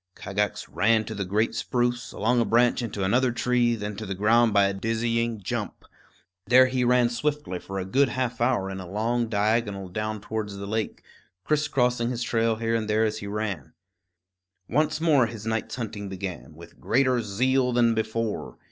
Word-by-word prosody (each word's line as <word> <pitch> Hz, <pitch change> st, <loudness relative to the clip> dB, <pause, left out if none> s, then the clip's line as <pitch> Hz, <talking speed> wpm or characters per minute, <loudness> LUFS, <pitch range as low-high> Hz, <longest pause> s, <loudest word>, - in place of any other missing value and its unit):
Kagax 105 Hz, 0 st, -2 dB
ran 110 Hz, 0 st, +2 dB
to 110 Hz, -, -5 dB
the 100 Hz, -2 st, -3 dB
great 105 Hz, +5 st, 0 dB
spruce, 120 Hz, +1 st, -1 dB
along 120 Hz, +3 st, +1 dB
a -, -, +1 dB
branch 120 Hz, +2 st, +3 dB
into 105 Hz, -4 st, -3 dB
another 125 Hz, +6 st, +2 dB
tree; 120 Hz, 0 st, +1 dB
then 105 Hz, -1 st, -5 dB
to 110 Hz, -, -5 dB
the 95 Hz, -, -3 dB
ground 115 Hz, +4 st, +4 dB
by 100 Hz, -1 st, +4 dB
a 100 Hz, -, 0 dB
dizzy 115 Hz, +2 st, -1 dB
jump. 100 Hz, -, -5 dB, 0.6 s
There 130 Hz, +1 st, +7 dB
he 130 Hz, -1 st, 0 dB
ran 125 Hz, 0 st, +4 dB
swiftly 145 Hz, -5 st, -2 dB
for 95 Hz, +2 st, -7 dB
a 95 Hz, -, -2 dB
good 135 Hz, +7 st, +2 dB
half 125 Hz, -1 st, -2 dB
hour 120 Hz, -6 st, +1 dB
in 95 Hz, -, -5 dB
a 90 Hz, -2 st, -8 dB
long 115 Hz, +3 st, -1 dB
diagonal 105 Hz, -2 st, 0 dB
down 110 Hz, +3 st, -3 dB
towards 105 Hz, 0 st, -4 dB
the 100 Hz, 0 st, -6 dB
lake, 110 Hz, +1 st, -3 dB, 0.4 s
crisscrossing 125 Hz, -6 st, +1 dB
his 125 Hz, -1 st, -2 dB
trail 115 Hz, -1 st, +1 dB
here 115 Hz, +1 st, -2 dB
and 115 Hz, -2 st, 0 dB
there 110 Hz, +1 st, +3 dB
as 110 Hz, 0 st, -2 dB
he 100 Hz, -, -7 dB
ran. 105 Hz, -2 st, -4 dB, 0.9 s
Once 155 Hz, +1 st, +1 dB
more 145 Hz, -7 st, +4 dB
his 110 Hz, -2 st, -8 dB
night's 110 Hz, 0 st, -2 dB
hunting 110 Hz, -4 st, -5 dB
began, 95 Hz, -4 st, -6 dB
with 85 Hz, +1 st, -14 dB
greater 130 Hz, 0 st, +2 dB
zeal 125 Hz, +5 st, +1 dB
than 120 Hz, -1 st, +3 dB
before. 110 Hz, 0 st, -3 dB
115 Hz, 185 wpm, -26 LUFS, 105-120 Hz, 0.9 s, There